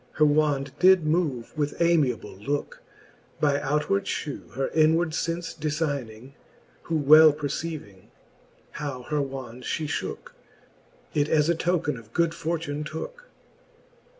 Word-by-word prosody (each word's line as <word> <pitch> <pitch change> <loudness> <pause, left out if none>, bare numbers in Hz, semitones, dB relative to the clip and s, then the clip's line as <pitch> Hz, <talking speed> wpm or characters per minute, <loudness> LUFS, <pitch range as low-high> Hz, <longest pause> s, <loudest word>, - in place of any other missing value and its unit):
Her 155 - +4
wand 145 -2 +2
did 185 -2 +6
move 150 -7 -1
with 145 -1 -2
amiable 155 - +1
looke. 140 +9 -4 0.6
By 145 -1 +2
outward 150 +8 0
Ihew 145 -3 -4
her 135 +2 -1
inward 160 +1 +3
fence 165 +1 -2
defining. 145 -6 -3 0.5
Who 165 - -2
well 155 +2 +8
perceiving, 145 - -5 0.6
how 140 -4 -5
her 150 +3 -1
wand 130 -3 -6
fhe 155 +5 -2
fhooke. 145 - -4 0.8
It 145 0 +1
as 155 0 +3
a 170 - +3
token 165 -4 0
of 115 0 -14
good 170 -1 +2
fortune 165 -3 -3
tooke. 325 - -7
150 Hz, 125 wpm, -26 LUFS, 140-165 Hz, 0.8 s, well